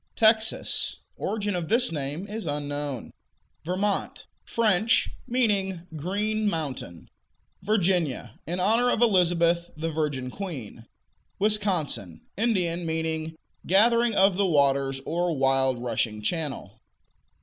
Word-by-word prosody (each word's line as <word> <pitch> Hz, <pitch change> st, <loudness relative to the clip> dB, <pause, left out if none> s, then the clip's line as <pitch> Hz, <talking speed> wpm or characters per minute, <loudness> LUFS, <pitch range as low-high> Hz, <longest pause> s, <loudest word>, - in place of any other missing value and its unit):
Texas 220 Hz, 0 st, +2 dB, 0.2 s
Origin 205 Hz, -2 st, -2 dB
of 175 Hz, -2 st, -3 dB
this 245 Hz, +3 st, +3 dB
name 150 Hz, +3 st, -3 dB
is 210 Hz, -2 st, -6 dB
unknown. 145 Hz, -3 st, -3 dB, 0.5 s
Vermont 190 Hz, +4 st, -2 dB, 0.2 s
French; 220 Hz, -1 st, +2 dB, 0.2 s
meaning 200 Hz, -7 st, +1 dB
"green 210 Hz, +7 st, -1 dB
mountain." 135 Hz, -, -5 dB, 0.5 s
Virginia 180 Hz, -, 0 dB
In 175 Hz, +3 st, -2 dB
honor 225 Hz, +6 st, +3 dB
of 240 Hz, -, +2 dB
Elizabeth, 175 Hz, -4 st, +3 dB
the 165 Hz, +1 st, -2 dB
"Virgin 145 Hz, -5 st, -2 dB
Queen." 130 Hz, -, -7 dB, 0.5 s
Wisconsin 190 Hz, -, -1 dB
Indian; 180 Hz, -6 st, 0 dB
meaning 160 Hz, 0 st, -2 dB, 0.3 s
"gathering 230 Hz, +4 st, +4 dB
of 195 Hz, -1 st, +4 dB
the 200 Hz, -1 st, +2 dB
waters," 140 Hz, -3 st, +2 dB
or 170 Hz, -1 st, -1 dB
"wild 135 Hz, -1 st, +2 dB
rushing 115 Hz, -3 st, -2 dB
channel." 135 Hz, -, -3 dB
170 Hz, 105 wpm, -26 LUFS, 145-205 Hz, 0.5 s, gathering